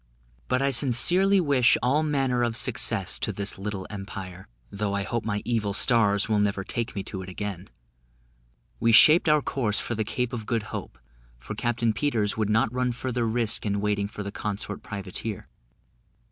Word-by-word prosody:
But 130 +1 0
I 140 - +2
sincerely 170 +10 +5
wish 140 -7 +3
all 135 +5 +2
manner 135 -5 0
of 120 -1 0
success 110 -5 +1
to - - -1
this 100 0 -1
little 100 -1 -5
empire, 95 -2 -8 0.2
though 100 0 -2
I 100 - -1
hope 115 +3 -3
my 105 -2 -3
evil 110 -4 -1
stars 105 -5 +3
will 110 -2 +1
never 100 -1 0
take 115 +4 -4
me 100 - -3
to 95 0 -7
it 95 - -9
again. 95 -1 -6 1.1
We 115 - +2
shaped 155 +8 +7
our 150 -2 +3
course 110 -6 0
for - - -3
the 110 -1 -1
Cape 125 +3 -3
of 110 -3 -5
Good 115 -3 -1
Hope, - - -6 0.4
for 65 +11 -8
Captain 115 0 -1
Peters 115 -4 -1
would 110 -2 -1
not 110 +2 +1
run 125 -1 -1
further 125 -1 -2
risk 115 0 -1
in 100 -1 -1
waiting 100 -1 -1
for 105 0 -7
the 100 - -6
consort 105 0 -5
privateer. 100 0 -5
110 Hz, 180 wpm, -25 LUFS, 100-125 Hz, 1.1 s, shaped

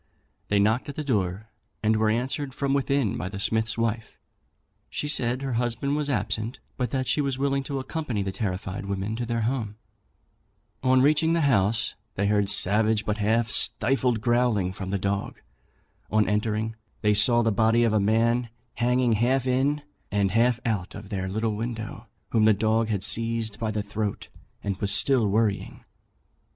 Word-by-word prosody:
They 100 - +2
knocked 110 +7 +2
at 140 - -6
the 155 - -3
door, 105 -5 -1 0.3
and 110 +1 +3
were 110 0 +2
answered 130 +4 -2
from 140 -1 0
within 140 -5 +1
by 95 - -4
the 100 - -7
smith's 110 +3 0
wife. 115 -1 -2 0.7
She 150 - -3
said 130 -2 0
her 135 -2 -2
husband 120 +4 -1
was 150 -1 -1
absent, 115 -3 -2 0.2
but 125 -2 -2
that 130 +1 -2
she 150 - +2
was 135 -2 -1
willing 140 0 +1
to 140 0 -3
accompany 130 -5 -3
the 95 - -3
terrified 95 0 -4
women 100 +2 -2
to 120 -1 -3
their 115 0 -1
home. 110 -3 -2 1.1
On 130 0 +4
reaching 155 +3 +3
the 170 - +2
house, 115 -5 +2 0.2
they 100 - 0
heard 105 0 +2
a - - -8
savage 105 +2 +2
but 105 0 -1
half 110 +1 +1
stifled 125 -1 +1
growling 120 -6 +1
from 95 -1 -6
the 100 - 0
dog. 100 +1 -2 0.7
On 110 0 +2
entering 110 +1 -1 0.3
they 105 -1 +3
saw 120 +3 +4
the 115 - +2
body 115 +3 +3
of 115 -2 +2
a 110 - +3
man 115 +3 +2 0.3
hanging 125 0 +2
half 125 +4 +2
in 135 +3 +1 0.3
and 100 -2 +1
half 120 +3 +3
out 105 -6 -2
of 105 -1 -9
their 95 -2 -3
little 110 +2 -1
window, 115 0 -5 0.2
whom 110 -2 +3
the 110 - +6
dog 110 +2 +1
had 100 -3 -1
seized 115 -2 -1
by 115 -2 -1
the 105 -1 -2
throat, 105 0 -4 0.3
and 100 -2 -2
was 100 0 +1
still 130 -6 +3
worrying. 105 0 -1
110 Hz, 180 wpm, -26 LUFS, 105-125 Hz, 1.1 s, the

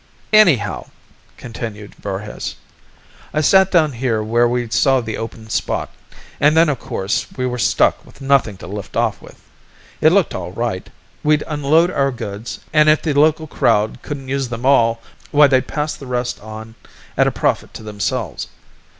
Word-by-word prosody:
"Anyhow," 145 - +4 0.5
continued 110 -3 -7
Voorhis, 100 +1 -6 0.8
"I 155 - +2
set 190 +4 +5
down 160 -5 +3
here 115 -3 -1
where 120 +2 +2
we 120 0 -1
saw 135 0 +3
the 115 -3 -4
open 115 -1 -7
spot, - - -2 0.5
an' 150 +2 +4
then 165 0 +5
of 140 -5 -1
course 95 +2 -2
we 130 - -1
were 125 -1 -2
stuck - - +2
with - - -18
nothin' 135 -7 +2
to - - -10
lift 100 +2 -7
off - - 0
with. - - -15 0.6
It 155 - +6
looked 195 -1 +2
all 90 -1 -5
right. 115 -4 -3 0.3
We'd 150 0 +3
unload 155 +3 +2
our 140 -5 +1
goods, 115 -2 -6
an' 150 -1 +5
if 155 0 +4
the 155 - 0
local 155 +2 +3
crowd 110 -7 +1
couldn't 140 -3 -6
use 135 -1 -2
them 120 +1 -5
all, 115 -4 +3 0.3
why 150 0 +6
they'd 130 -2 +2
pass 150 0 -2
the 135 - -11
rest 125 -1 -2
on 110 +1 -9 0.4
at - - +3
a - - +1
profit - - -1
to - - -8
themselves. 105 -1 -3
125 Hz, 170 wpm, -19 LUFS, 110-150 Hz, 0.8 s, It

